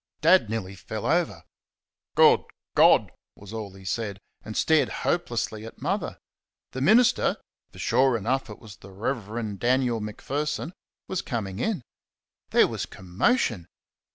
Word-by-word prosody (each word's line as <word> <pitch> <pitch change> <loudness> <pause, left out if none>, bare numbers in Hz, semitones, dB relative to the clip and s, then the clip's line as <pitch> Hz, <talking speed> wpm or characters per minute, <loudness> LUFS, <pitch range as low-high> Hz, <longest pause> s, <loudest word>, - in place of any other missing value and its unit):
Dad 165 - +5
nearly 110 -4 -3
fell 95 - -6
over. - - +1 0.7
"Good - - +7 0.3
God!" - - +5 0.2
was 100 +1 -12
all 110 -3 -5
he 95 0 -14
said, 100 0 -2 0.3
and 110 - -6
stared 160 -2 +3 0.2
hopelessly 115 -9 -1
at 115 - -10
Mother. - - -2 0.5
The 130 - -5
minister 220 - +4 0.3
for - - -15
sure 130 +1 +3
enough 130 +5 -1
it 105 - -8
was 105 -2 -13
the 100 - -14
Rev. 110 -1 -3
Daniel 125 -1 +2
Macpherson 145 - -3 0.3
was 190 - -2
coming 100 -5 -4
in. 205 - -1 0.7
There - - +5
was - - -4
commotion. 95 - 0
115 Hz, 135 wpm, -26 LUFS, 100-135 Hz, 0.7 s, Good